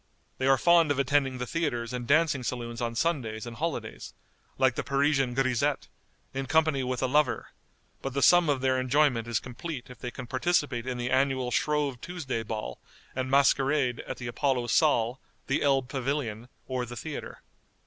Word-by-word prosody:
They 130 - +1
are 135 0 +5
fond 170 +1 +5
of 145 - +1
attending 135 -1 +1
the 125 - -3
theatres 125 -6 -2
and 120 -1 -4
dancing 150 -2 +3
saloons 120 -1 -4
on 115 -1 -2
Sundays 120 -8 -1
and 120 -1 -8
holidays, 165 +1 -4 0.4
like 130 -2 +3
the - - -3
Parisian 140 -2 +1
grisette, 130 -3 0 0.4
in 135 0 -3
company 155 -2 +2
with 130 0 -2
a - - +2
lover, 145 -1 +1 0.5
but 135 -1 -5
the 140 - +1
sum 175 -3 +6
of 140 -3 +1
their 130 -1 +2
enjoyment 130 -3 +2
is 115 -2 0
complete 125 +1 -7
if 125 - -13
they 125 - -4
can 125 +1 -8
participate 130 -2 0
in 125 -1 -2
the 120 +1 -3
annual 130 -1 +1
Shrove 145 -2 0
Tuesday 150 -10 -4
ball 105 - -5 0.4
and 130 0 -2
masquerade 135 -1 +3
at - - -5
the 125 - -7
Apollo 125 +1 0
Saal, 125 -5 +2 0.3
the 135 - 0
Elb 135 -3 +2
Pavilion, 130 -3 -3 0.2
or 130 -1 -2
the 120 0 -7
theatre. 100 - -7
130 Hz, 180 wpm, -28 LUFS, 120-145 Hz, 0.5 s, sum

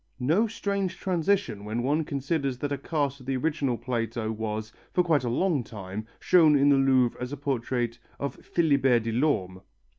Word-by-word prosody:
No 165 - +2
strange 200 -4 -2
transition 180 - 0
when 110 +3 -3
one 150 +5 +1
considers 140 -2 -2
that 145 +3 -3
a 140 - 0
cast 140 -2 -1
of 130 - -14
the 135 -1 0
original 140 -3 0
Plato 115 -1 -2
was, 110 0 -4 0.2
for 180 - +3
quite 160 -6 +2
a 120 - -1
long 150 +2 +1
time, 105 0 -7
shown 160 -5 +5
in 140 +1 +4
the 140 - +6
Louvre 130 -3 +3
as 125 - -3
the 145 - -5
portrait 120 -3 -2 0.2
of 140 - -2
Philibert 135 -8 +2
Delorme. 115 -6 0
135 Hz, 175 wpm, -27 LUFS, 115-155 Hz, 0.2 s, the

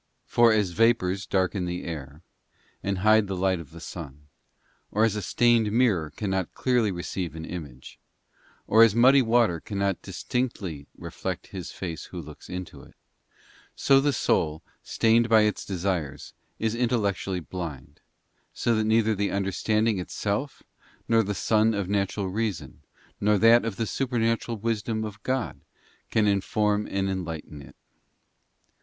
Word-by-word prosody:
For 120 -1 +4
as 105 -4 +2
vapours 100 -2 +2
darken 95 0 0
the 90 0 -4
air, 75 -1 -7 0.6
and 100 -1 -2
hide 110 -1 +5
the 95 - -3
light 95 -1 +1
of 80 -5 -10
the 85 - -12
sun, 75 -4 -9 0.6
or 105 - +1
as 110 -2 +2
a 105 - -2
stained 115 +1 +3
mirror 105 -10 +2
cannot 95 +3 -3
clearly 120 -5 +1
receive 85 -1 -4
an 80 0 -6
image, 70 -8 -9 0.7
or 110 - +5
as 115 -2 +6
muddy 130 +4 +6
water 115 -7 +2
cannot 100 +1 -2
dis - - -8
tinctly 95 - -3
reflect - - -5
his 90 -3 -6
face 85 -4 -6
who 90 - -8
looks 75 -2 -11
into 90 -1 -7
it, - - -17 0.8
so 135 0 +4
the 145 +1 +2
soul, 80 - 0 0.2
stained 115 +1 +2
by 110 -1 +6
its 105 -1 0
desires, 90 -6 -3 0.2
is 110 0 -1
intellectually 105 -6 0
blind, 75 -5 -7 0.5
so 120 - +1
that 110 -1 +1
neither 110 0 +3
the 100 0 -1
un 100 0 -1
derstanding 110 +1 +1
itself 105 +9 -3 0.4
nor 115 -1 +4
the 105 -1 -3
sun 110 +3 +2
of 100 -3 -2
natural 100 0 -1
reason, 105 -1 -3 0.4
nor 105 0 +3
that 115 +3 +6
of 115 -3 -3
the 115 - -1
supernatural 115 -2 -1
wisdom 110 0 -2
of 105 0 -8
God, 130 -1 -2 0.5
can 110 -1 +2
inform 105 +1 +1
and 95 0 -1
enlighten 85 -6 -5
it. - - -14
100 Hz, 150 wpm, -26 LUFS, 90-115 Hz, 0.8 s, as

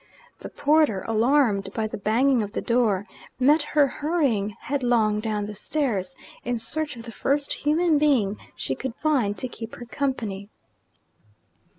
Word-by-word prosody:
The - - -8
porter, 290 -9 +2
alarmed 225 -3 +2
by 220 - 0
the 215 - -4
banging 235 +5 +2
of 205 0 -5
the - - -1
door, 225 -5 +1 0.3
met 295 +5 +5
her 295 0 +3
hurrying 270 - 0
headlong 240 -6 +1
down 215 -2 -2
the 210 - -6
stairs, 210 -6 -2 0.3
in 245 0 -1
search 290 +5 -1
of 230 - -9
the 230 - -8
first 280 +5 0
human 310 +1 +2
being 240 -9 +2 0.2
she 135 - -3
could 250 - -5
find 255 -10 +1
to 255 - -3
keep 230 -2 -8
her 240 - -9
company. 230 -7 -3
240 Hz, 155 wpm, -25 LUFS, 210-285 Hz, 0.3 s, met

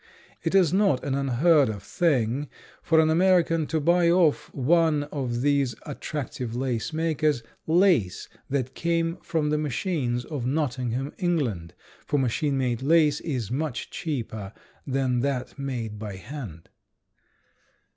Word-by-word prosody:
It - - -1
is 180 -4 +4
not 195 -9 +2
an 140 - -2
unheard 140 +2 +3
of 100 -2 -5
thing 140 -4 0 0.3
for 160 -1 +3
an 160 0 +4
American 165 -2 +3
to 160 - 0
buy 170 +3 +3
of 160 -4 +3
one 155 +2 +2
of 125 -5 -2
these 140 -3 +1
attractive 130 -5 -5
lace 125 0 -2
makers 155 -5 0 0.2
lace 160 - +3 0.2
that 130 -2 -1
came 170 0 0
from 155 -4 -1
the 150 - +1
machines 140 -5 -1
of 145 -6 -4
Nottingham, 130 -1 -1
England, 130 - -1 0.3
for 145 - +1
machine 135 +2 0
made 125 -3 -1
lace 150 0 +4
is 125 - -3
much 140 -1 -3
cheaper 110 -9 -4 0.3
than 130 -2 0
that 135 +1 -2
made 120 -6 -4
by 105 -3 -6
hand. 105 - -9
140 Hz, 135 wpm, -26 LUFS, 125-160 Hz, 0.3 s, is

